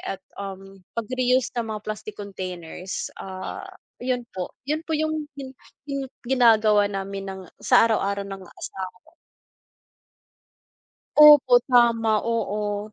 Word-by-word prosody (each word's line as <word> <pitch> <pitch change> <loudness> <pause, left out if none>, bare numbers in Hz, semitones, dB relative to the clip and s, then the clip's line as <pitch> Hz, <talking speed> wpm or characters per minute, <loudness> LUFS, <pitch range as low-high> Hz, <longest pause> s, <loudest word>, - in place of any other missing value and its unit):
at, 195 - -5 0.2
um, 195 0 -8 0.2
pagre-use 250 +2 +1
ng 230 - -4
mga - - -7
plastic 215 0 -5
containers, 185 -2 -6
ah, 185 -1 -6 0.4
'yun 250 -1 0
po, 180 -1 -4 0.2
'yun 305 +2 -1
po - - -10
'yung 315 0 0 0.7
'yung 275 -1 -3 0.2
ginagawa 220 -5 +5
namin 195 0 -5
ng 190 0 -7 0.2
sa - - +6
araw-araw 200 -3 0
ng 195 -1 -7
asawa 185 +1 -8
ko. - - -20 2.1
Opo, 295 -4 +9
tama, 230 -4 +4
oo. 210 -2 -2
215 Hz, 115 wpm, -24 LUFS, 195-245 Hz, 2.1 s, Opo